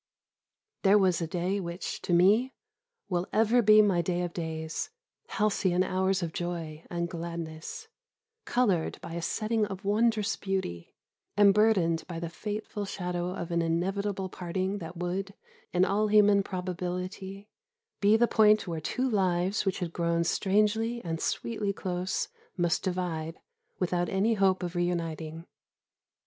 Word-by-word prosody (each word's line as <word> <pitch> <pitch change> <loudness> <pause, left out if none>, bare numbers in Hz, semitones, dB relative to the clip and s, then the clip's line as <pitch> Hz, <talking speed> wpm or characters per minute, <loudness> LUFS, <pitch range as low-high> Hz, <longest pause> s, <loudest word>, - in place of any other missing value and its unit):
There 200 +1 +6
was 185 -4 +3
a 165 - -1
day 180 +4 -1
which, 170 -1 -5
to - - -4
me, 205 +9 +4 0.5
will 180 -1 -1
ever 225 +3 +4
be 215 -1 +7
my 190 -4 +3
day 175 +1 -1
of 175 -1 -4
days 160 -1 -4 0.4
halcyon 190 -4 +1
hours 190 0 0
of 165 -1 -3
joy 165 -3 -4
and 170 0 -2
gladness, 165 -2 -6 0.6
coloured 200 -10 +1
by 165 - -7
a 170 - -3
setting 215 +5 0
of 195 0 -7
wondrous 220 0 +2
beauty, 190 - -3 0.4
and 205 -1 +7
burdened 195 -6 +3
by 170 -2 -5
the 170 0 -4
fateful 210 +2 -4
shadow 180 -2 -3
of 170 - -5
an 170 0 +2
inevitable 190 +4 -1
parting 185 +2 -3
that 165 0 -8
would, 190 +3 -3 0.4
in 180 +1 +3
all 210 +2 +1
human 205 -1 +5
probability, 185 +2 -5 0.5
be 210 +2 +5
the 240 +1 +4
point 215 -3 +4
where 165 -2 -3
two 255 +11 -1
lives, 190 -2 +1
which 190 - +1
had 175 -3 -4
grown 170 -1 +1
strangely 215 +6 +1
and 165 -1 -3
sweetly 215 -3 -1
close, 185 0 -2 0.3
must 175 -1 +1
divide, 175 -4 -3 0.4
without 175 -1 0
any 200 +4 +2
hope 195 -3 +2
of 175 -1 -3
re 175 - +2
uniting. 165 -2 -3
185 Hz, 145 wpm, -29 LUFS, 170-205 Hz, 0.6 s, be